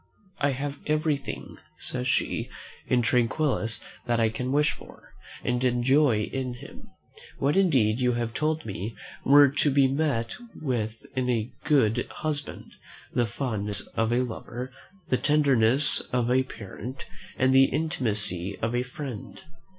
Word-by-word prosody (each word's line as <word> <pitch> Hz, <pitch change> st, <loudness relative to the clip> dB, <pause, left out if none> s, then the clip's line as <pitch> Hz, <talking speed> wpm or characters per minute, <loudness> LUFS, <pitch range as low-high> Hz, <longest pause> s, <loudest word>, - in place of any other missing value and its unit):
"I 140 Hz, -1 st, +2 dB
have 140 Hz, +2 st, -4 dB
everything," 150 Hz, -2 st, -2 dB, 0.2 s
says 60 Hz, -, -3 dB
she, -, -, 0 dB, 0.4 s
"in 125 Hz, -1 st, +2 dB
Tranquillus 120 Hz, 0 st, +1 dB, 0.2 s
that 120 Hz, -1 st, +1 dB
I 115 Hz, -1 st, +3 dB
can 125 Hz, +4 st, -3 dB
wish 150 Hz, +2 st, +3 dB
for; -, -, -14 dB, 0.3 s
and 125 Hz, 0 st, 0 dB
enjoy 125 Hz, -1 st, +3 dB
in 130 Hz, +1 st, -4 dB
him, 120 Hz, -, -13 dB, 0.5 s
what 140 Hz, +4 st, +1 dB
indeed 130 Hz, -, +3 dB
you 125 Hz, -1 st, +2 dB
have 120 Hz, -1 st, -2 dB
told 155 Hz, +3 st, -1 dB
me 100 Hz, +2 st, -5 dB, 0.3 s
were 145 Hz, +1 st, +7 dB
to 145 Hz, +2 st, +1 dB
be 140 Hz, -1 st, +4 dB
met 135 Hz, -5 st, 0 dB, 0.3 s
with 115 Hz, -6 st, -2 dB, 0.2 s
in 130 Hz, -1 st, 0 dB
a 115 Hz, -1 st, 0 dB
good 120 Hz, -5 st, +2 dB
husband, 150 Hz, -2 st, -5 dB, 0.4 s
the 120 Hz, -2 st, +1 dB
fondness 105 Hz, -4 st, -2 dB
of 115 Hz, 0 st, +1 dB
a 125 Hz, +2 st, +2 dB
lover, 125 Hz, +1 st, -6 dB, 0.4 s
the 130 Hz, -, +3 dB
tenderness 140 Hz, -3 st, +5 dB
of 125 Hz, -1 st, +1 dB
a 130 Hz, +1 st, +4 dB
parent, 120 Hz, +1 st, -8 dB, 0.3 s
and 130 Hz, +1 st, +3 dB
the 135 Hz, 0 st, +7 dB
intimacy 110 Hz, -, -1 dB
of 115 Hz, +1 st, -2 dB
a 120 Hz, -, +1 dB
friend." 125 Hz, -2 st, -7 dB
125 Hz, 145 wpm, -26 LUFS, 115-140 Hz, 0.5 s, were